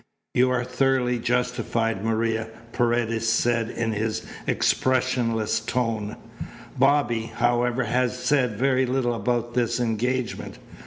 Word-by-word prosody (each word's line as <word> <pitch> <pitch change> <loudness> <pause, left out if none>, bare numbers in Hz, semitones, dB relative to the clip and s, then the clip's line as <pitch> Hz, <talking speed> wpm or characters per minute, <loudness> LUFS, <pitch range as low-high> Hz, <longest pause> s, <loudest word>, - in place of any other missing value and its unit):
"You 125 +1 +4
are 125 -1 +1
thoroughly 125 -1 +1
justified, 115 -3 -1
Maria," 115 0 0 0.3
Paredes 115 -1 +1
said 115 0 +1
in 115 -1 -2
his 110 +1 -2 0.2
expressionless 120 -4 +1
tones. 110 -2 -2 0.6
"Bobby, 135 -4 +2
however, 120 +1 +1
has 125 0 0
said 125 -3 +1
very 130 +1 +2
little 125 -1 0
about 120 0 -1
this 120 0 0
engagement. 120 +2 -2
120 Hz, 110 wpm, -24 LUFS, 115-125 Hz, 0.6 s, You